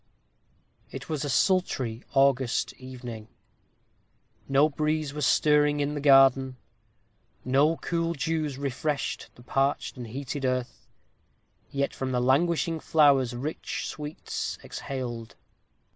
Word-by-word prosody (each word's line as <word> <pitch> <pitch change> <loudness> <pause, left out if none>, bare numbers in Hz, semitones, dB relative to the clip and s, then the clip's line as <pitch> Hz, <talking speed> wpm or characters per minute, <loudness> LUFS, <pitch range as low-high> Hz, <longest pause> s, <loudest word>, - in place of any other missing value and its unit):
It 135 +2 -8
was 155 -2 -2
a 145 - -2
sultry 130 - +1
August 135 -3 +2
evening. 125 -4 -8 1.2
No 140 +2 +5
breeze 155 -1 -1
was 150 -3 0
stirring 150 0 +3
in 145 +1 0
the 145 - -4
garden; 135 -2 +5 0.9
no 140 +5 +3
cool 170 -1 -1
dews 155 -2 -2
refreshed 140 +1 -2
the 120 - -16
parched 135 +2 0
and 120 -2 -6
heated 135 +4 -5
earth; 130 -1 -2 0.8
yet 140 0 -1
from 130 -1 -3
the 125 - +2
languishing 160 +5 +2
flowers 140 -6 +3
rich 145 +6 -4
sweets 150 0 -5
exhaled. 120 -4 -6
140 Hz, 115 wpm, -27 LUFS, 130-150 Hz, 1.2 s, No